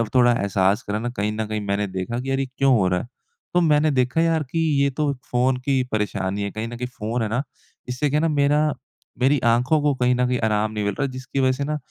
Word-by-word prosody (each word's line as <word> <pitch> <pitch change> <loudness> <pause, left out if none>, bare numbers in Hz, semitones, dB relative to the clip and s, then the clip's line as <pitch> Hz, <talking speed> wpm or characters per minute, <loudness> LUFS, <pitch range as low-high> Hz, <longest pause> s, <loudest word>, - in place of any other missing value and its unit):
थोड़ा 120 -1 +6
एहसास 100 -2 +1
करा 105 +1 -2
न 120 +2 -3
कहीं 105 +1 0
न 110 0 -2
कहीं 105 -1 -3
मैंने 100 +1 0
देखा 95 +6 -4
कि 135 +1 -5
यार 135 0 0
ये 135 - 0
क्यों 135 -1 +4
हो 95 -3 +2
रहा 90 0 +1
है? - - -10 0.5
तो 175 - +4
मैंने 155 -1 +3
देखा 130 +4 +1
यार 165 -2 +2
कि 165 - -1 0.2
ये 140 - +3
तो 150 -2 +1 0.2
फ़ोन 125 +1 +2
की 135 -2 +2
परेशानी 100 -2 -1
है। 100 - -3
कहीं 110 +2 -4
न 120 0 -7
कहीं 125 0 -3
फ़ोन 115 +3 -2
है 105 - -2
ना, 120 +5 -1 0.4
इससे 125 +4 -1
क्या 150 - +1
है - - 0
ना - - 0
मेरा 145 +2 +3 0.6
मेरी 135 +2 +4
आँखों 130 +6 +2
को 145 -1 +2
कहीं 125 0 +2
न 125 0 +1
कहीं 125 -1 0
आराम 105 0 +1
नहीं 105 -1 -3
मिल 100 - 0
रहा 145 - -1
है 135 - -4
जिसकी 130 +1 -5
वज़ह 130 -1 +3
से 140 - -2
न 150 - -1
125 Hz, 265 wpm, -23 LUFS, 105-140 Hz, 0.6 s, थोड़ा